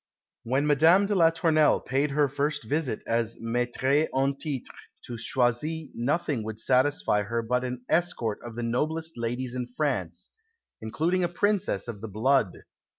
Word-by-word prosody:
When 135 +5 0
Madame 160 +7 +5
de 205 - -1
la 170 -4 +5
Tournelle 160 -2 +3
paid 135 +3 0
her 145 +1 +2
first 145 +1 -2
visit 135 -1 -2
as 115 0 -1
Maîtresse 125 +5 0
en 135 +1 +1
titre 140 -2 -5 0.3
to 120 - -6
Choisy, 125 +7 -1
nothing 140 0 -1
would 110 0 -6
satisfy 130 -3 +2
her 115 +3 -2
but 125 +2 0
an 125 0 -5
escort 160 -11 0
of 120 -1 -8
the 120 - -4
noblest 160 +7 -2
ladies 120 +1 -3
in 125 -1 -3
France, 125 - -3 0.5
including 165 +11 0
a - - +2
Princess 205 -1 0
of 110 -4 -7
the 110 - -5
Blood. 110 0 +1
130 Hz, 155 wpm, -27 LUFS, 115-155 Hz, 0.5 s, Madame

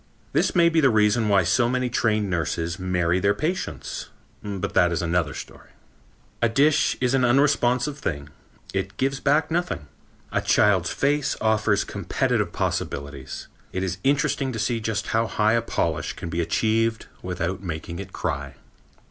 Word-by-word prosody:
This - - +1
may 170 -1 +6
be 165 -1 +3
the 135 - +5
reason 105 0 +3
why 100 -2 +4
so 120 +8 +2
many 125 0 0
trained 110 -3 +1
nurses 85 -1 -2
marry 90 -1 +1
their 100 +2 +2
patients 175 - -3 0.3
but 100 -3 -4
that 90 -1 +4
is 85 +1 -1
another 85 -3 0
story. - - -10 0.7
A 120 - +3
dish 145 +6 +3
is 125 0 +1
an 135 -1 +3
unresponsive 130 +1 +2
thing. 70 - -4 0.4
It 95 0 -3
gives 135 +1 0
back 155 +2 +2
nothing. 175 - -1 0.5
A - - +1
child's 95 -4 +3
face 145 +1 +1
offers 110 -2 +2
competitive - - -1
possibilities. 70 -2 -4 0.2
It 95 - -2
is 95 0 -3
interesting 135 -1 +1
to - - -4
see 115 +2 0
just 110 -1 -2
how 115 0 +1
high 110 0 +2
a 115 - +3
polish 115 - -1
can 85 - -7
be 85 +1 -1
achieved 115 +6 +1 0.2
without 90 +1 -3
making 85 -1 -5
it 95 -1 -7
cry. 70 -3 -3
105 Hz, 160 wpm, -24 LUFS, 90-125 Hz, 0.7 s, may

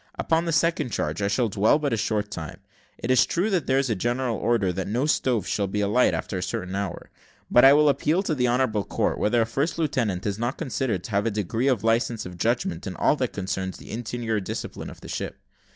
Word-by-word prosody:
"Upon 165 +1 +1
the 165 - -1
second 155 -4 +1
charge 75 0 -2
I 100 - +1
shall 120 +4 +1
dwell 105 +6 +3
but 145 -4 -1
a - - +3
short 105 -1 -1
time. 80 -3 -7 0.4
It 120 - -2
is 130 - +6
true 195 +6 0
that 180 -7 0
there 130 - +3
is 135 0 +2
a 115 - +1
general 120 +4 -1
order 105 -4 +1
that 95 +1 -3
no 120 +7 0
stoves 125 - +1
shall 100 -1 0
be 105 +2 -2
alight 105 +5 +3
after 95 - -3
a - - -4
certain 90 +1 -4
hour; 100 -2 -4 0.4
but 120 - +6
I 135 +1 +9
will 150 +1 +5
appeal 150 +6 +2
to 175 - -1
the 125 -4 +1
honourable 120 -4 +1
court, - - -1
whether 115 +2 +3
a - - -2
first 140 +9 -1
lieutenant 115 - -1
is 100 0 -2
not 120 +2 -2
considered 130 - -2
to 100 - -8
have 100 +2 +1
a - - +3
degree 110 +4 -1
of 125 -7 +1
licence 115 0 +1
of 90 -1 -9
judgment 120 - -1
in 95 - -5
all - - +3
that 130 -3 -1
concerns 95 -1 -3
the - - -11
interior 115 -1 -2
discipline 95 - -5
of - - -13
the - - -10
ship. - - -4
115 Hz, 240 wpm, -25 LUFS, 100-135 Hz, 0.4 s, I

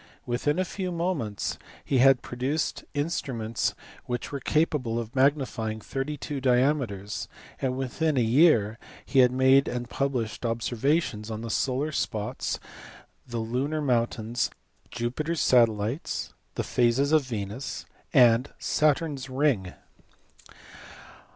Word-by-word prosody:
Within 125 +6 0
a 185 - +1
few 185 0 -4
months 165 - -2 0.3
he 135 - +2
had 135 0 +6
produced 135 +6 -2
instruments 135 -7 -1 0.3
which 120 -1 -3
were 140 - -3
capable 135 -5 +1
of 115 +1 -5
magnifying 130 -5 +1
thirty 135 +6 -4
two 140 0 -5
diameters, 125 -6 +1 0.3
and 130 -1 0
within 135 +3 0
a 125 - +4
year 115 -4 +4 0.3
he 135 - +2
had 125 -1 +6
made 130 +2 +5
and 120 0 -4
pub 140 0 0
lished 115 -2 -3
observations 115 0 0
on 110 0 -4
the 115 -1 -4
solar 135 +6 0
spots, 110 -3 -2 0.7
the 120 -1 -4
lunar 125 +7 -1
mountains, 120 -4 0 0.4
Jupiter 125 +7 -2
s 165 - -1
satellites, 115 +2 +2 0.2
the - - -1
phases 125 +4 +2
of 155 -1 +5
Venus, 110 +1 -5 0.3
and 125 -2 +5
Saturn 150 +1 +1
s 130 0 -8
ring. 130 -9 +1
130 Hz, 125 wpm, -27 LUFS, 115-145 Hz, 0.7 s, had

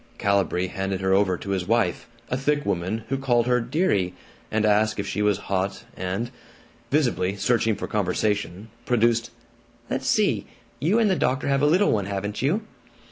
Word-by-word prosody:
Calibree 100 -2 +1
handed 95 0 -3
her 95 0 +2
over 95 -2 +3
to 100 - -6
his 95 -2 -1
wife, 115 +1 +1 0.2
a - - +2
thick 145 +3 0
woman 95 +6 -1
who 135 - -1
called 120 -3 +2
her 125 -1 +2
"dearie," 115 - 0 0.3
and 110 0 +1
asked 110 +1 +2
if 100 - -1
she 105 - -2
was 105 -2 +3
hot 95 +2 -2
and, 95 +6 -3 0.6
visibly 120 -10 +1
searching 110 +2 +1
for 105 - -5
conversation, 105 0 -1 0.2
produced, 115 -1 +2 0.6
"Let's - - -2
see, - - +2 0.3
you 170 - +2
and 230 -2 +4
the 190 - +3
doctor 135 -3 0
have 140 0 +2
a 145 - +4
Little 185 +7 +4
One, 100 -3 +1
haven't 100 +1 -3
you?" 170 - +1
110 Hz, 175 wpm, -24 LUFS, 95-125 Hz, 0.6 s, and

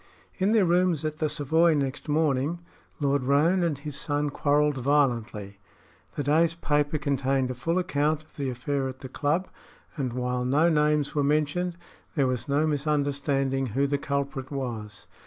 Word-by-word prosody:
In 190 +3 +2
their 220 -4 +4
rooms 175 -3 +2
at 155 0 -3
the 155 -1 0
Savoy 160 +2 +2
next 140 +2 -3
morning 150 +1 +1 0.4
Lord 140 -1 +1
Roane 150 +8 +3
and 165 -5 0
his 145 0 -6
son 145 0 -1
quarreled 145 0 +2
violently. 120 -7 0 0.6
The 145 - -2
day's 160 +4 +3
paper 150 -1 0
contained 135 -3 0
a - - -2
full 165 +8 -1
account 155 -4 0
of 155 - -25
the 140 -2 -2
affair 135 +2 -2
at 130 0 -8
the 130 - -7
club, 160 +7 0 0.5
and 130 -6 -2
while 125 0 -1
no 145 +7 +3
names 150 -1 +2
were 145 - +1
mentioned, 155 +4 0 0.4
there 140 -4 +3
was 125 0 -2
no 145 +3 +2
misunderstanding 140 -2 0
who 135 +5 0
the 140 0 0
culprit 140 -1 -3
was. 115 -7 -5
145 Hz, 165 wpm, -26 LUFS, 135-155 Hz, 0.6 s, their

